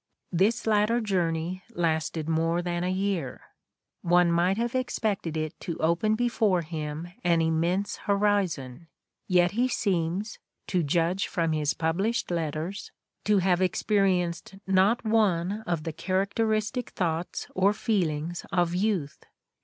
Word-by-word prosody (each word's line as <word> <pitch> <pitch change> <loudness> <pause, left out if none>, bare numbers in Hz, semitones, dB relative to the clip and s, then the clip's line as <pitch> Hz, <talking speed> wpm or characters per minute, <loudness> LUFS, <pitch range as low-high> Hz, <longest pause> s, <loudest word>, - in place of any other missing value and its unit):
This 210 +7 +2
latter 220 +2 +3
journey 180 -4 -1
lasted 160 -2 -1
more 165 +2 +1
than 175 0 -2
a 180 - 0
year; 185 -8 -1 0.6
one 175 0 +4
might 175 +3 +2
have 235 +1 -1
expected 215 -9 -1
it 155 0 -2
to 170 -3 -5
open 170 +7 +2
before 220 -6 +1
him 155 +1 -5
an 170 -1 +3
immense 170 +5 0
horizon; 190 -9 0 0.4
yet 180 -1 +4
he 240 +5 +1
seems, 195 -2 -1 0.3
to 180 -2 0
judge 170 +5 +1
from 165 -2 0
his 155 -1 0
published 190 +9 -1
letters, 165 +3 -3 0.3
to 210 -1 +4
have 185 -1 +2
experienced 185 -2 +1
not 195 +5 +3
one 205 -3 +1
of 170 -3 -1
the 165 - -4
characteristic 215 - -1
thoughts 170 -1 -2
or 190 +2 +3
feelings 175 -7 -1
of 175 -1 +1
youth. 180 -6 -1
180 Hz, 130 wpm, -27 LUFS, 165-205 Hz, 0.6 s, one